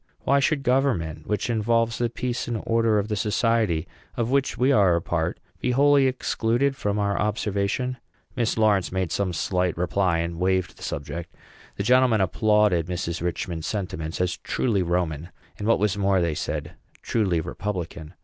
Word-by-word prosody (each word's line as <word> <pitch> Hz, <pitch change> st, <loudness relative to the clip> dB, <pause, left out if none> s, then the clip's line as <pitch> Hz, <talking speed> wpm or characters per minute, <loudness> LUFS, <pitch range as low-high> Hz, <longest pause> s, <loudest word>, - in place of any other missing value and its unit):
Why 140 Hz, +1 st, +3 dB
should 140 Hz, +1 st, +1 dB
government, 105 Hz, -, 0 dB
which 105 Hz, -2 st, -1 dB
involves 115 Hz, 0 st, +1 dB
the 120 Hz, -1 st, +1 dB
peace 120 Hz, +1 st, -3 dB
and 115 Hz, -2 st, -3 dB
order 115 Hz, -1 st, +2 dB
of 100 Hz, 0 st, 0 dB
the 105 Hz, -, -1 dB
society 105 Hz, -4 st, +1 dB, 0.3 s
of 115 Hz, +1 st, -1 dB
which 140 Hz, 0 st, +1 dB
we 130 Hz, +3 st, +3 dB
are 100 Hz, -9 st, +4 dB
a -, -, +2 dB
part, 80 Hz, -1 st, -2 dB, 0.2 s
be 125 Hz, -, 0 dB
wholly 140 Hz, +1 st, +5 dB
excluded 130 Hz, +1 st, 0 dB
from 105 Hz, -5 st, -1 dB
our 100 Hz, -1 st, 0 dB
observation?" 105 Hz, +4 st, -1 dB, 0.4 s
Mrs. 120 Hz, -2 st, 0 dB
Lawrence 105 Hz, -4 st, +2 dB
made 95 Hz, -3 st, -1 dB
some 95 Hz, +1 st, 0 dB
slight 90 Hz, 0 st, -1 dB
reply, 90 Hz, 0 st, +1 dB
and 85 Hz, 0 st, -3 dB
waived 95 Hz, -1 st, 0 dB
the -, -, -17 dB
subject. 80 Hz, +4 st, -5 dB, 0.4 s
The 100 Hz, -, -2 dB
gentlemen 125 Hz, 0 st, +4 dB
applauded 105 Hz, -2 st, +2 dB
Mrs. 85 Hz, -1 st, -3 dB
Richman's 85 Hz, -2 st, -3 dB
sentiments 90 Hz, -6 st, -4 dB
as 90 Hz, -1 st, 0 dB
truly 110 Hz, -7 st, 0 dB
Roman, 85 Hz, -2 st, -1 dB, 0.3 s
and, 105 Hz, -, -3 dB
what 115 Hz, -, +4 dB
was 105 Hz, -1 st, +1 dB
more, 100 Hz, -1 st, +2 dB
they 85 Hz, -2 st, +1 dB
said, -, -, -4 dB, 0.3 s
truly 95 Hz, -7 st, +1 dB
republican. 85 Hz, -2 st, -5 dB
100 Hz, 170 wpm, -25 LUFS, 85-115 Hz, 0.4 s, wholly